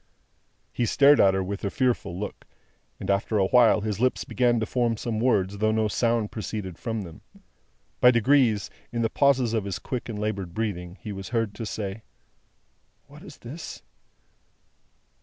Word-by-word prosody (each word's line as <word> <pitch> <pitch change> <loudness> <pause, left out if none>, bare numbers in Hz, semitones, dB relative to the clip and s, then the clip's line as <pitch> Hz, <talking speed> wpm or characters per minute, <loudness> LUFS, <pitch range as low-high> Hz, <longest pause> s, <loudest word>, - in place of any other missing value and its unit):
He 120 - 0
stared 140 +5 +5
at 95 -1 +5
her 95 - 0
with 100 +1 -5
a 100 - 0
fearful 120 -8 -1
look, 105 - -7 0.5
and - - -6
after 100 +2 0
a 95 - +3
while 115 0 +5
his 105 -1 -3
lips 130 +1 +1
began 120 -2 +2
to 110 - -1
form 120 -1 0
some 110 -1 -3
words, 100 -5 +1
though 110 +1 +2
no 110 0 +1
sound 115 0 0
proceeded 105 -5 -5
from 115 -3 -3
them. 85 -3 -11 0.8
By 125 - +7
degrees, 120 -3 +3 0.2
in 120 -1 -1
the 115 - 0
pauses 130 -5 +3
of 110 -3 0
his 100 -3 -3
quick 125 -2 -5
and 110 - -4
laboured 100 -5 -3
breathing, 95 -5 -3
he 105 - -6
was 95 -1 -7
heard 115 -4 -1
to 115 0 -6
say: 100 0 -5 1.0
"What - - -15
is - - -12
this?" 145 +8 -9
110 Hz, 175 wpm, -26 LUFS, 100-120 Hz, 1.0 s, By